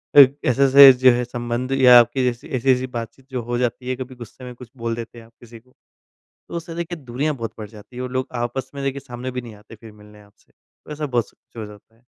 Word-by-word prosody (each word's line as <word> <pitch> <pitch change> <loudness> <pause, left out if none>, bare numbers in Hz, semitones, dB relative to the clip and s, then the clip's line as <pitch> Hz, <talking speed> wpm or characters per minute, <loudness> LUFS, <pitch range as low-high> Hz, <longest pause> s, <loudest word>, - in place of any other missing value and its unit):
फ़िर 140 -1 +8
ऐसे-ऐसे 135 +1 +8
जो 130 0 +5
है 125 0 -1
संबंध 120 +1 -4
या 125 -2 +7
आपके 120 +2 +1
जैसे 120 +2 -2
ऐसी-ऐसी 130 +1 +1
बातचीत 120 +2 -8
जो 125 -2 -3
हो 120 +1 -3
जाती 125 +1 -2
है 130 - -1
कभी 130 0 -8
गुस्से 120 +2 -12
में 125 - -8
कुछ 120 -2 -13
बोल 115 0 -3
देते 115 0 -9
हैं 115 - -15
आप 115 - -22
किसी 115 -1 -14
को। 125 +2 -30 0.8
तो - - -7
उससे 165 0 -8
देखिए 170 0 -5
दूरियाँ 140 +5 -2
बहुत 115 -3 -6
बढ़ 105 -1 -7
जाती 110 +3 -15
है 125 - -5
और 125 0 -5
लोग 130 0 -2
आपस 130 +2 -4
में 140 - -5
देखिए 135 0 -2
सामने 125 0 -7
भी 125 0 -4
नहीं 115 -3 -11
आते 105 +2 -15
फ़िर 110 0 -14
मिलने 105 0 -17
आपसे। 100 0 -26
तो - - -20
ऐसा 150 0 -4
बहुत 120 -4 -1
सा - - -28
कुछ - - -22
हो - - -5
जाता 105 +2 -16
है। 120 - -31
125 Hz, 255 wpm, -21 LUFS, 115-130 Hz, 0.8 s, फ़िर